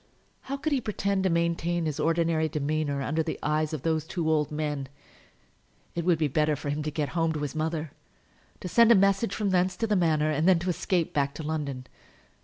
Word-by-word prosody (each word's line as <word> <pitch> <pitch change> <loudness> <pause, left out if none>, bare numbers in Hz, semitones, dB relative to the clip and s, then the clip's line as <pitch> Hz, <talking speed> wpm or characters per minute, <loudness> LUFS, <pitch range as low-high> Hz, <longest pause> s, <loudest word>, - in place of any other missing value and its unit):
How 275 - -2
could 300 +2 -1
he 270 - +1
pretend 200 -3 -1
to 190 - +2
maintain 170 0 0
his 155 -1 -3
ordinary 165 0 +1
demeanour 150 -1 -1
under 155 +4 0
the 160 0 -3
eyes 155 0 0
of 155 -5 -5
those 160 -2 +1
two 165 0 -3
old 150 -2 +1
men? 150 -3 -3 1.1
It 170 - -2
would 175 -2 +3
be 155 -1 +1
better 150 +2 +1
for 145 0 -4
him 150 +1 -2
to 150 - -2
get 150 -1 -2
home 165 -1 0
to 150 - -4
his 145 - -3
mother, 155 -1 -2 0.7
to - - -4
send 235 +5 +5
a - - +8
message 195 +1 +2
from 205 -2 0
thence 180 0 +1
to 225 - 0
the 210 -2 +1
Manor, 155 -4 +2
and 155 +3 +1
then 185 -2 +6
to 175 +2 -1
escape 175 0 -1
back 140 -1 0
to 160 - -6
London. 145 -4 -3
160 Hz, 215 wpm, -27 LUFS, 150-180 Hz, 1.1 s, a